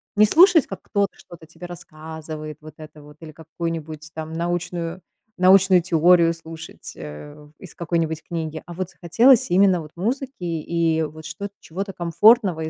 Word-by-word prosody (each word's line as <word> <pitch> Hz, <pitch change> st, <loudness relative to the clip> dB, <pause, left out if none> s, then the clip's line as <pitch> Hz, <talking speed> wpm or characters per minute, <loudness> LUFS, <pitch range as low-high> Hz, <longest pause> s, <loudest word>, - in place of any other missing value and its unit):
Не 210 Hz, -, +6 dB
слушать, 335 Hz, -, +6 dB
как 195 Hz, -, -8 dB
кто-то 200 Hz, -1 st, -1 dB
что-то 165 Hz, -2 st, -14 dB
тебе 165 Hz, +2 st, -11 dB
рассказывает 155 Hz, -2 st, -8 dB
вот 155 Hz, -1 st, -12 dB
это 155 Hz, -1 st, -13 dB
вот 150 Hz, 0 st, -16 dB
или 155 Hz, -1 st, -10 dB
какую-нибудь 160 Hz, -1 st, -6 dB
там 160 Hz, 0 st, -6 dB
научную 175 Hz, +1 st, -3 dB, 0.4 s
научную 185 Hz, 0 st, +5 dB
теорию 170 Hz, 0 st, +4 dB
слушать, 165 Hz, 0 st, -10 dB
э, 145 Hz, -, -10 dB
из 185 Hz, -, -12 dB
какой-нибудь 165 Hz, -2 st, -2 dB
книги, 160 Hz, -2 st, -5 dB
а 175 Hz, -, -9 dB
вот 185 Hz, +1 st, -4 dB
захотелось 225 Hz, +7 st, +3 dB
именно 185 Hz, -1 st, +4 dB
вот 150 Hz, -, -11 dB
музыки 255 Hz, +8 st, -2 dB
и 165 Hz, -1 st, 0 dB
вот 155 Hz, +1 st, -7 dB
что 165 Hz, +6 st, -6 dB
чего-то 195 Hz, +4 st, -6 dB
комфортного 180 Hz, +1 st, +3 dB
и 160 Hz, -, -3 dB
165 Hz, 155 wpm, -22 LUFS, 160-185 Hz, 0.4 s, Не